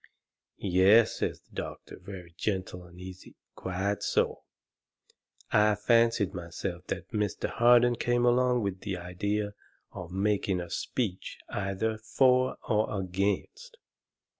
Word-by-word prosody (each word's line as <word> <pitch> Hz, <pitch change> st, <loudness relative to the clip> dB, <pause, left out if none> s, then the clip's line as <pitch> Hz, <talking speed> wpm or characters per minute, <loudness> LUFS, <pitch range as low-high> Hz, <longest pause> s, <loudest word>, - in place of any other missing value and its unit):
"Yes," 100 Hz, +5 st, +4 dB
says -, -, -2 dB
the -, -, -28 dB
doctor, -, -, -7 dB
very 90 Hz, -4 st, -10 dB
gentle 95 Hz, -2 st, -3 dB
and 85 Hz, 0 st, -15 dB
easy. 95 Hz, 0 st, -10 dB, 0.2 s
"Quite 95 Hz, +2 st, -2 dB
so! -, -, 0 dB, 1.1 s
I 105 Hz, 0 st, +4 dB
fancied 115 Hz, -1 st, +3 dB
myself 90 Hz, 0 st, -5 dB
that 95 Hz, 0 st, -5 dB
Mr. 105 Hz, -2 st, -1 dB
Harden 120 Hz, +1 st, +5 dB
came 120 Hz, +1 st, +1 dB
along 125 Hz, -1 st, +3 dB
with 95 Hz, -2 st, -2 dB
the 95 Hz, -2 st, -4 dB
idea 100 Hz, +4 st, -2 dB, 0.4 s
of 90 Hz, -2 st, -8 dB
making 100 Hz, -1 st, 0 dB
a 85 Hz, -1 st, -6 dB
speech 105 Hz, -8 st, -3 dB
either 105 Hz, +3 st, -2 dB
for 130 Hz, +3 st, +3 dB
or 105 Hz, -1 st, +1 dB
against." 100 Hz, -, -2 dB
100 Hz, 120 wpm, -29 LUFS, 95-115 Hz, 1.1 s, Harden